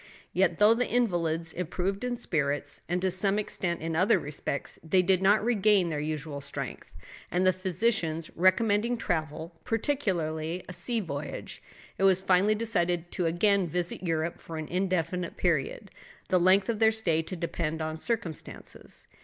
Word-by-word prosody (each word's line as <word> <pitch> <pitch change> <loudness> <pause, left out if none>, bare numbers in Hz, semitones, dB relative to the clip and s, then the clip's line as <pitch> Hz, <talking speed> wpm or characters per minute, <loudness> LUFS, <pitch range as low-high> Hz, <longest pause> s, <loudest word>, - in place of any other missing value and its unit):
Yet, 180 -2 +2
though 210 +2 +6
the 245 +2 -1
invalids 170 -8 0
improved 180 +3 -2
in 245 -1 -2
spirits, 145 - 0
and 175 +1 +1
to 190 - +2
some 195 +2 +2
extent 180 -4 -2
in 165 0 -2
other 185 +5 +4
respects, 140 -1 -4
they 180 +3 +3
did 185 0 +2
not 205 +2 +4
regain 210 -5 +3
their 150 -2 -2
usual 150 -1 -4
strength, 140 - -6 0.4
and 180 +1 +1
the 185 - +5
physicians 185 -3 0
recommending 205 +6 +3
travel, 160 -4 -3
particularly 180 - -1
a 180 - -7
sea 225 +7 0
voyage, 145 -5 -6 0.4
it - - 0
was 190 -1 +4
finally 195 +3 +3
decided 175 -6 0
to 175 - 0
again 195 +3 +2
visit 175 +2 -2
Europe 165 -2 -2
for 165 - -7
an 155 -1 -5
indefinite 180 -1 -1
period, 175 +4 -1 0.4
the 185 - +4
length 190 +2 +4
of 225 -2 -1
their 220 -1 +6
stay 180 -8 +1
to 175 +3 -6
depend 165 -2 -3
upon 155 0 -3
circumstances. 215 -7 -5
180 Hz, 160 wpm, -28 LUFS, 165-200 Hz, 0.4 s, though